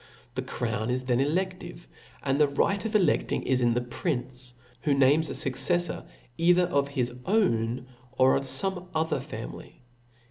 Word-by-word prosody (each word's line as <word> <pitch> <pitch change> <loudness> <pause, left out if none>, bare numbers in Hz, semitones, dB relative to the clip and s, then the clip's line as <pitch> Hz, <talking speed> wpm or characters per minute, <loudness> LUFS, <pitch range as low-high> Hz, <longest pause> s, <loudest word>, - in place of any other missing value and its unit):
The - - -2
crown, 110 -1 -3
is 130 +1 -1
then 125 -1 +1
eledive, 175 +4 -2 0.4
and 140 +1 +1
the 150 - +6
right 195 +8 +1
pt 185 - -7
el€;<5ling 180 -8 +2
is 130 -1 +1
in 120 -1 +3
ihc 120 0 -3
prince, 125 -5 -3 0.3
who 145 -2 +2
names 140 +3 +4
a - - -3
fucceflbr 175 +6 0 0.3
either 175 +2 +5
of 140 -5 +1
his 130 -4 -1
pwn 125 - 0 0.3
or, 130 0 +4
of - - +1
fome 185 +5 +1
other 160 +1 +1
family. - - -9
140 Hz, 155 wpm, -27 LUFS, 125-175 Hz, 0.4 s, the